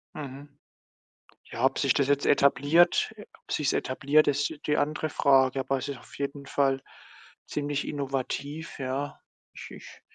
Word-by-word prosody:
Mhm. 140 0 -8 1.0
Ja, 120 +3 0
ob 135 - +2
sich 140 -3 +3
das 140 -2 +1
jetzt 145 0 +1
etabliert 145 +9 +4
äh, 210 - -10 0.2
ob - - -13
sich's 150 -2 +1
etabliert, 140 +4 +2
ist 145 +2 +1
die 150 - +2
andere 155 +1 0
Frage. 135 -2 +3
Aber 135 0 0
es 130 - -5
ist 140 -3 -5
auf - - -15
jeden 140 0 -4
Fall 135 -1 +1 0.7
ziemlich 145 -1 -2
innovativ, 140 +2 -4
ja. 135 +2 -3 0.3
Ich - - -10
ich - - -12
140 Hz, 155 wpm, -27 LUFS, 135-145 Hz, 1.0 s, etabliert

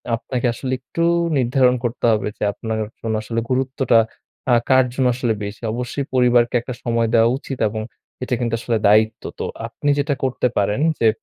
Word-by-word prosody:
আপনাকে 125 +2 -3
আসলে 130 +2 -5
একটু 165 +6 -3 0.3
নির্ধারণ 125 0 +3
করতে 120 0 -2
হবে 105 -2 0
যে - - -4
আপনার 110 +1 -4 0.2
জন্য 110 -1 -2
আসলে 115 +1 -2
গুরুত্বটা 130 -2 +2 0.5
আ - - +7
কার 130 -1 +5
জন্য 130 -1 +1
আসলে 120 -2 0
বেশি। 100 +3 -6
অবশ্যই 125 +3 -3
পরিবারকে 125 -1 +3
একটা 125 - -6
সময় 115 -1 +1
দেওয়া 115 0 +5
উচিত 135 -1 -7
এবং 110 +1 -4 0.4
এটা 125 - -3
কিন্তু 120 -2 -1
আসলে 115 -1 0
দায়িত্ব। 110 +1 +3 0.2
তো - - -2 0.2
আপনি 145 - -3
যেটা 145 +1 +1
করতে 130 -1 +1
পারেন 105 +6 +1 0.2
যে 115 - +4
120 Hz, 175 wpm, -20 LUFS, 115-130 Hz, 0.5 s, আ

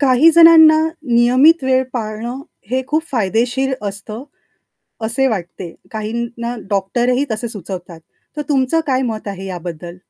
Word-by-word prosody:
काही 275 +3 +5
जणांना 325 -2 +7 0.3
नियमित 255 +7 +4
वेळ 260 0 +2
पाळणं, 235 +2 -5 0.3
हे 260 +1 0
खूप 310 +3 0
फायदेशीर 245 +3 0
असतं 215 +5 -8 0.8
असे 255 +4 0
वाटते. 175 -5 -5 0.2
काहींना 235 +2 -4
डॉक्टरही 240 +7 0
तसे 220 +2 -3
सुचवतात. 180 -5 -8 0.4
तर 300 - -2
तुमचं 275 +2 +1
काय 260 -2 +1
मत 220 -4 -4
आहे 195 -1 -6
याबद्दल? 175 -1 -7
235 Hz, 125 wpm, -17 LUFS, 200-265 Hz, 0.8 s, जणांना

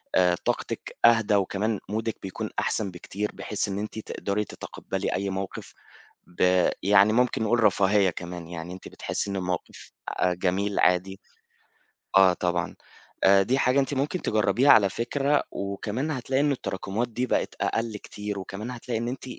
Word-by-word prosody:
آآ 90 -1 +4
طاقتِك - - -3
أهدى 115 -3 +5
وكمان 100 +2 0
مودِك 110 +1 -2
بيكون 95 -1 -4
أحسن 100 -3 -1
بكتير، 100 +4 -4
بحيث 105 0 -3
إن 100 0 -3
أنتِ 105 +1 -5
تقدري 105 -1 -2
تتقبلي - - -5
أي 100 +1 -1
موقف 95 0 -5 0.5
ب 90 +1 +3
يعني 100 +2 +5
ممكن 125 -1 +2
نقول 115 +1 +2
رفاهية 100 -1 +4
كمان، 85 -1 -7
يعني 85 +1 -6
أنتِ 95 - -10
بتحسي 100 - -4
إن 100 - -2
الموقف 90 -2 -4 0.2
آآ 90 -1 +1
جميل 95 +3 0
عادي 95 +2 +2 1.0
آه 95 -1 +7
طبعًا، 90 -1 -2 0.7
دي 130 +7 +1
حاجة 130 +1 +3
أنتِ 140 +1 -1
ممكن 145 +6 -1
تجربيها 115 +6 +3
على 100 -3 +6
فكرة، 140 +7 +1
وكمان 105 +8 -3
هتلاقي 130 -1 -1
إن 145 0 +3
التراكمات 110 -2 -3
دي 125 +2 -2
بقت - - 0
أقل 115 -2 -1
كتير 105 0 -6
وكمان 100 +5 -6
هتلاقي 120 -1 -4
إن 120 +1 -2
أنتِ 125 +1 -5
105 Hz, 155 wpm, -26 LUFS, 95-115 Hz, 1.0 s, آه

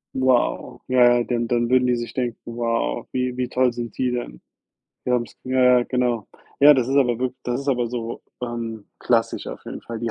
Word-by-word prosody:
Wow. 125 -1 +1
Ja, 125 -1 +5
ja, - - +1
dann 120 -1 -1
dann 120 0 +1
würden 125 0 +4
die 125 - +3
sich 120 0 -5
denken: 120 -3 -2
„Wow, 115 0 -2
wie 125 -1 -1
wie 125 -1 -1
toll 125 -1 +2
sind 120 -3 -6
die 125 -1 0
denn? 120 - -5 0.6
Die 125 - -2
haben's 120 -2 -1
"ja, 130 0 +1 0.2
ja, - - +1
genau. 120 -4 -1 0.3
Ja, 145 +1 +9
das 130 -3 +1
ist 135 - +1
aber 120 -4 +3
wirk 130 0 -2
das 125 +2 -2
ist 140 - -6
aber 120 -3 +1
so, 115 -1 -5 0.2
ähm, 115 -3 -4
klassisch - - 0
auf - - -8
jeden - - -7
Fall. 115 -1 -6
Die 115 0 -2
120 Hz, 215 wpm, -23 LUFS, 120-125 Hz, 0.6 s, Ja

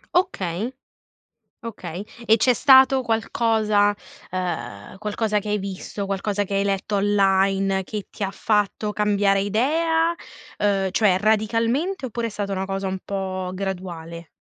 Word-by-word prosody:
Okay. 225 - 0 0.9
Okay. 195 -4 -7 0.2
E 225 0 +5
c'è 250 +3 +4
stato 265 +1 +6
qualcosa 220 -3 +2 0.4
ehm, 125 - -4
qualcosa 210 +1 -1
che 210 +1 -6
hai 210 - +1
visto, 195 +1 -5
qualcosa 200 +1 -1
che 200 - -6
hai 195 - +2
letto 200 +1 -1
online, 195 -1 +2
che 210 0 -6
ti 205 - -6
ha 195 - -1
fatto 210 0 0
cambiare 200 -1 +2
idea, 325 - +1 0.4
ehm, 195 -2 +1
cioè 190 -2 +3
radicalmente, 230 - +1
oppure 235 -1 -3
è - - -5
stata 200 -1 -3
una 190 0 -2
cosa 195 0 -3
un 190 0 -3
po' 185 -2 -3
graduale? 175 -4 -6
205 Hz, 135 wpm, -23 LUFS, 190-220 Hz, 0.9 s, stato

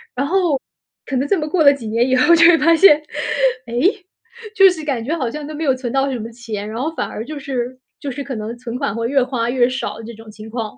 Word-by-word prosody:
然 280 +3 -1
后 345 -6 +1 0.5
可 270 - -3
能 275 +3 -1
这 385 - +1
么 305 - -3
过 320 +1 +1
了 280 -1 +7
几 240 -6 -8
年 230 +3 +1
以 260 - +2
后 340 +7 +5
就 335 0 +6
会 340 -1 +7
发 330 +2 +4
现， 325 -3 +7 0.7
哎， 230 - -8 0.8
就 385 -1 +7
是 340 -4 -4
感 260 -6 -2
觉 315 +7 -2
好 255 -6 -2
像 300 +4 -6
都 305 - -7
没 320 - -4
有 275 -4 +3
存 255 -2 -5
到 270 +1 0
什 250 - -3
么 225 +1 -6
钱， 220 -3 -6
然 225 +2 -5
后 320 +3 -2
反 - - -3
而 220 - -6
就 305 +1 -7
是 255 -2 -4 0.2
就 280 - -5
是 280 +3 -5
可 270 -2 -6
能 220 +2 -5
存 240 0 -6
款 275 -7 -2
会 230 0 -2
越 275 -2 +3
花 245 -2 -2
越 245 -1 +2
少 255 -3 -5
这 235 - -8
种 225 0 -13
情 215 +1 -11
况。 230 0 -5
260 Hz, 290 characters per minute, -19 LUFS, 230-300 Hz, 0.8 s, 了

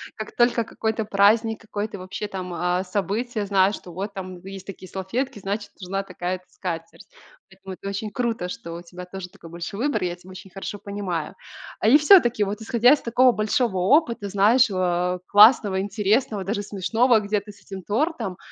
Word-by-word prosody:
как 215 - -7
только 240 -1 +3
какой-то 220 0 -2
праздник, 215 +2 +3
какое-то 210 -1 -5
вообще 185 +3 -6
там, 185 -3 -6
а, 180 +1 0
событие, 205 +4 -2
знаю, 195 0 +3
что 180 - -9
вот 195 +4 -5
там 185 -2 -7
есть 195 0 -9
такие 190 -1 -9
салфетки, 230 +6 -3
значит, 205 +1 -4
нужна 195 +2 -3
такая-то 185 -1 -5
скатерть. 165 -2 -6 0.4
Поэтому 190 0 -10
это 195 - -7
очень 205 +2 -4
круто, 225 -5 -2
что 170 -2 -7
у 170 - -7
тебя 180 +1 -10
тоже 180 0 -8
такой 165 - -14
большой 170 +5 -6
выбор, 285 - -1
я 175 -1 -2
тебя 180 +1 -17
очень 185 0 -11
хорошо 195 +1 -6
понимаю. 195 -6 -4 0.4
А, 215 - +1
и 265 - +8
всё-таки, 295 - +5
вот 205 +2 -4
исходя 240 +4 +4
из 300 - 0
такого 245 +2 +4
большого 215 -1 0
опыта, 235 - +2
знаешь, 220 +6 +4
а, 180 -1 0
классного, 205 -2 +6
интересного, 210 +1 0
даже 205 +2 -2
смешного, 220 +4 +2
где-то 210 0 -2
с - - -20
этим 195 -1 -8
тортом, 225 - -2
200 Hz, 180 wpm, -24 LUFS, 185-225 Hz, 0.4 s, и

